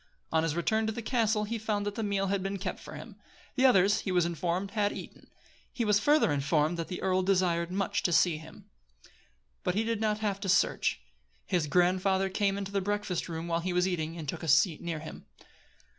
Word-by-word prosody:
On 160 - +3
his 160 -1 -1
return 220 +6 +1
to - - 0
the 230 +1 -6
castle 220 -3 +1
he 225 +2 -3
found 210 -1 -1
that 205 - -2
the 225 - -4
meal 200 -2 0
had 195 0 0
been 195 +1 -3
kept 195 - -4
for - - -10
him. - - -10 0.4
The 265 0 +4
others, 205 -2 +4
he 190 - -3
was 180 -2 +3
informed, 175 +3 -2
had 205 -2 +1
eaten. - - -10 0.4
He 235 - -2
was 210 -1 +4
further 290 - +3
informed 150 +3 +1
that 165 - -3
the 180 - -6
earl 185 0 +2
desired 180 -3 +1
much 195 0 -1
to 175 - 0
see 170 -1 +3
him. 160 0 -13 1.0
But 180 - 0
he 215 - +1
did 225 -1 -2
not 215 -1 +1
have 205 -2 -2
to 200 -1 -4
search. 195 - +2 0.4
His 175 -4 0
grandfather 185 +3 +2
came 200 0 0
into 200 -1 -5
the 200 -1 0
breakfast 205 -3 -2
room 165 0 -4
while 165 0 0
he 180 +1 -2
was 180 +1 +2
eating, 165 -2 -3
and 160 -3 -7
took - - -4
a 165 - -5
seat 160 +2 +3
near 170 -2 -3
him. 155 - -10
190 Hz, 220 wpm, -29 LUFS, 170-205 Hz, 1.0 s, The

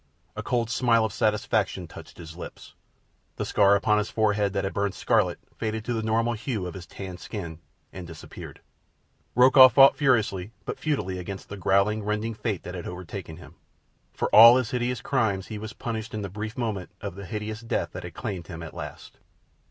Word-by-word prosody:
A - - -4
cold 120 -2 -1
smile 115 -2 +3
of 105 - -4
satisfaction 105 0 0
touched - - -12
his 80 -1 -10
lips. 90 - -10 0.6
The - - -3
scar 100 -1 +4
upon 105 +1 +2
his 105 - -2
forehead 105 -2 +1
that 100 - -1
had 95 - -3
burned 100 -1 -1
scarlet - - +1 0.2
faded 110 -1 -3
to 120 - -1
the 115 - -1
normal 115 +2 +1
hue 115 -3 -3
of 90 - -5
his 90 0 -9
tanned 95 -3 -8
skin 85 -7 -7 0.3
and 90 -2 -8
disappeared. 80 -2 -10 0.7
Rokoff 130 0 +8
fought 135 +2 +8
furiously 110 -7 +1
but - - -5
futilely 95 - -2
against 95 +2 -7
the 100 - -6
growling, 100 +3 +2
rending 105 +2 -2
fate 105 -3 -3
that 90 - -7
had 90 -2 -6
overtaken 90 -2 -7
him. 85 - -14 0.5
For - - -2
all 115 +3 +10
his 130 -4 -1
countless 125 0 -1
crimes 110 -8 0
he 110 -2 -5
was 110 0 -7
punished 110 -1 -5
in 105 - -3
the 100 - -4
brief 105 +4 -6
moment 110 -7 -3
of - - -5
the 100 0 -9
hideous 105 +3 -5
death 115 - -2
that - - -7
claimed 90 -4 -5
him 85 -2 -7
at 80 - -8
the - - -14
last. - - -9
105 Hz, 195 wpm, -26 LUFS, 95-115 Hz, 0.7 s, all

